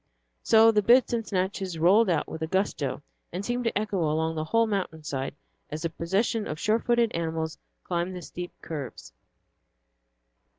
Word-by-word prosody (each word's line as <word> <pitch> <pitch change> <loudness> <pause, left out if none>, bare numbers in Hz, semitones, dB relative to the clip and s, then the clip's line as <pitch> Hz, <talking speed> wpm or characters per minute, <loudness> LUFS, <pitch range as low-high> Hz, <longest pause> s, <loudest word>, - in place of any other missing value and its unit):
So 225 0 +6
the 210 -1 +3
bits 245 +4 +5
and 230 -2 -1
snatches 190 -2 -2
rolled 190 +6 +5
out 170 - +1
with 160 - -7
a 160 - -1
gusto, 160 -7 -1 0.3
and 185 +4 -4
seemed 245 +1 -1
to 230 - +1
echo 210 -2 -1
along 160 0 +1
the 155 -1 -3
whole 230 +7 +3
mountain 190 -7 -3
side 135 -2 -3 0.3
as 155 +1 -5
the 165 - -1
procession 205 +7 0
of 155 - -5
sure 215 +5 +2
footed 235 -1 +2
animals 160 -1 -3 0.2
climbed 175 +1 -2
the 180 - -7
steep 175 +1 -7
curves. 145 -6 -7
185 Hz, 170 wpm, -27 LUFS, 160-220 Hz, 0.3 s, So